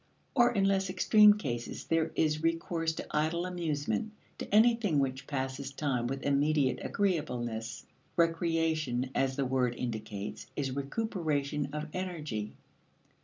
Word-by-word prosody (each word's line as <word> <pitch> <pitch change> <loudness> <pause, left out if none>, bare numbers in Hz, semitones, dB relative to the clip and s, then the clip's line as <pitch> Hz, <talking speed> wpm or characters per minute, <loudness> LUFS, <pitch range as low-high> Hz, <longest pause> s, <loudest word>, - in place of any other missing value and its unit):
Or, 245 -2 +5
in 200 -5 +1
less 195 -1 +2
extreme 210 +3 +6
cases, 120 - -4
there 165 -1 +1
is 155 -1 +1
recourse 165 0 0
to - - -6
idle 160 +3 0
amusement; 165 - -2 0.3
to - - -6
anything 220 -5 +4
which 135 0 -1
passes 135 -1 -3
time 135 -4 -1
with 135 +2 -4
immediate 140 -2 +2
agreeableness. 120 - -2 0.3
Recreation, 165 -6 +1
as 135 -1 +1
the 140 -1 0
word 125 -2 +1
indicates, 110 -4 -5
is 135 -3 -1
recuperation 145 - -1
of 150 0 -3
energy. 150 - -4
150 Hz, 125 wpm, -31 LUFS, 130-170 Hz, 0.3 s, extreme